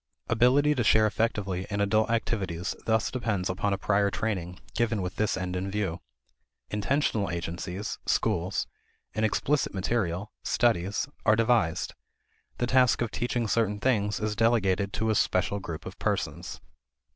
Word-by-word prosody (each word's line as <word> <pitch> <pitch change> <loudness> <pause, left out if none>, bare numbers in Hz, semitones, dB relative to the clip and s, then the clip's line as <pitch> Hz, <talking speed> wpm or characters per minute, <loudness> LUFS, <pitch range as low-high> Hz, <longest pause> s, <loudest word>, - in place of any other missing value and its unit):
Ability 130 +6 +4
to 125 -4 0
share 110 0 +5
effectively 105 -4 -1
in 100 -1 -2
adult 110 +2 +2
activities 100 -6 -1
thus 110 -1 +2
depends 105 -7 -1
upon 100 +2 -1
a 100 - +1
prior 100 0 +2
training 95 -4 -3
given 115 -2 +1
with 90 -1 -4
this 110 0 +1
end 90 0 -3
in 95 +2 -2
view. 95 -4 -2 0.7
Intentional 105 -1 0
agencies 90 +3 -4
schools 90 +3 +1 0.5
and 110 - -1
explicit 135 +4 +1
material 95 -1 -1
studies 105 -1 +1 0.2
are 110 - +5
devised. 115 -7 +1 0.6
The 120 - +1
task 125 -1 +4
of 115 - -3
teaching 120 -1 -1
certain 105 -2 +1
things 105 -4 +1
is 105 0 -1
delegated 100 -4 +2
to 110 +1 0
a - - +3
special 100 0 +1
group 85 -4 -7
of - - -8
persons. - - -2
105 Hz, 145 wpm, -28 LUFS, 95-115 Hz, 0.7 s, share